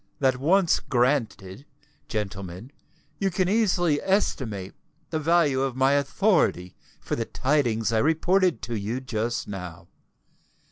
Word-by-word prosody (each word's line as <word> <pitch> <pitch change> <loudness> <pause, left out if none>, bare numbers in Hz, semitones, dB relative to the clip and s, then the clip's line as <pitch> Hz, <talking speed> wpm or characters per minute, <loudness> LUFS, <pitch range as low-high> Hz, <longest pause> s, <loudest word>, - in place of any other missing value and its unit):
That 130 -2 +2
once 175 +6 +3
granted, 120 -5 -1 0.4
gentlemen, 100 -1 -5 0.5
you 195 - +1
can 185 0 0
easily 180 -7 +2
estimate 115 - -1 0.4
the 160 - -1
value 155 -4 +2
of 135 -2 -1
my 135 +1 +3
authority 140 - +1 0.2
for - - -3
the 115 - -2
tidings 120 -6 0
I 110 - +3
reported 165 - +2
to 115 +2 -4
you 110 +4 -3
just 120 -2 -3
now. 90 -5 -8
130 Hz, 125 wpm, -25 LUFS, 110-165 Hz, 0.5 s, once